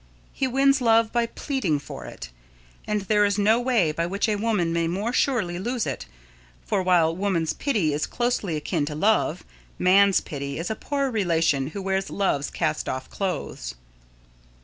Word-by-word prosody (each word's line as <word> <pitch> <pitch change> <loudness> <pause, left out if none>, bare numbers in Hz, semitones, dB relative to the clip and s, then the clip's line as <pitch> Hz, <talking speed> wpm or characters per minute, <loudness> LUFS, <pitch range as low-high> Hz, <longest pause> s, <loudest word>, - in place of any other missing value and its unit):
He 270 - 0
wins 275 +2 +3
love 225 -1 +4
by 235 -1 +2
pleading 230 - -1
for 145 - -8
it, - - -9 0.6
and 210 -1 0
there 210 +1 +2
is 200 0 +2
no 215 +3 +4
way 240 -10 +2
by 165 +2 -2
which 200 +5 -1
a 215 - +1
woman 205 -6 0
may 170 0 +1
more 200 +8 -2
surely 210 -12 +1
lose 240 +3 -2
it, 135 - -4 0.6
for 190 - 0
while 175 -3 +3
woman's 180 -4 0
pity 210 - 0
is 150 - -1
closely 240 -8 -1
akin 150 0 -1
to 150 - -4
Love, 180 -1 +1 0.3
man's 195 +1 +5
pity 140 -1 -5
is 170 +6 -3
a - - -1
poor 275 +1 -2
relation 165 - +1
who 190 +6 -6
wears 195 0 -1
Love's 145 -8 0
cast 155 -2 -2
off 130 0 -5
clothes. 190 - -4
195 Hz, 170 wpm, -25 LUFS, 165-225 Hz, 0.6 s, man's